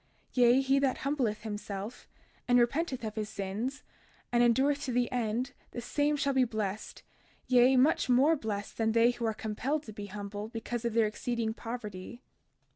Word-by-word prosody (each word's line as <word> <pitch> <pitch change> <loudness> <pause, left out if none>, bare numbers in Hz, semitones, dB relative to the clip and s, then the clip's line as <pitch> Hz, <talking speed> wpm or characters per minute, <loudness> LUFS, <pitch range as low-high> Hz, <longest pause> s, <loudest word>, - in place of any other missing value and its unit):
32:15 - - -17
Yea, 245 +1 +6
he 270 +1 +3
that 275 -2 +2
truly - - -10
humbleth 260 -7 -1
himself, 205 0 -6 0.4
and 245 0 +5
repenteth 260 +2 +1
of 215 -1 -3
his 215 -1 -3
sins, 215 +9 -4 0.5
and 240 0 +3
endureth 270 +5 +3
to 260 - -2
the 245 0 +1
end, 245 +2 -1 0.2
the - - -4
same 290 +5 0
shall 280 0 +1
be 260 -1 +4
blessed—yea, 230 +3 0
much 265 0 +3
more 270 +6 +5
blessed 210 -7 -5
than 220 0 +2
they 230 +1 +5
who 240 -1 -4
are 220 - -1
compelled 255 +9 -2
to 215 - -10
be 205 -1 -7
humble 205 +1 -6
because 230 +1 -5
of 235 -1 -1
their 230 -1 +4
exceeding 225 +1 -2
poverty. 225 -1 -7
240 Hz, 180 wpm, -30 LUFS, 215-260 Hz, 0.5 s, Yea